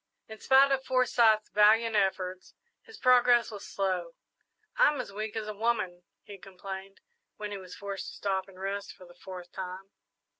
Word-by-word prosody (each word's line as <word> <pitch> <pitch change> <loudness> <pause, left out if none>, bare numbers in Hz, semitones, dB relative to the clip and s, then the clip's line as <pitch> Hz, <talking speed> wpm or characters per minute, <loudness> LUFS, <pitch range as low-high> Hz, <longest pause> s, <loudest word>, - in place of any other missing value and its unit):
In 220 0 -10
spite 270 +1 +5
of 265 -1 +1
Forsyth's 235 -4 +3
valiant 220 +2 +4
efforts, 185 -2 -1 0.3
his 450 -2 -14
progress 245 - +4
was 205 -2 -8
slow. 185 -4 -2 0.6
"I'm 295 -2 +4
as 235 -5 -6
weak 215 +1 -5
as 220 -1 -3
a 215 - -4
woman," 205 -5 -1 0.2
he 200 -2 -11
complained, 195 +1 -9 0.4
when 210 -1 -5
he 200 - -5
was 185 -1 -11
forced 200 -1 -6
to - - -8
stop 190 -1 -1
and 190 -1 -15
rest 200 +1 -4
for 185 -2 -15
the 175 - -16
fourth 180 0 -10
time. 190 +1 -7
200 Hz, 175 wpm, -29 LUFS, 190-230 Hz, 0.6 s, spite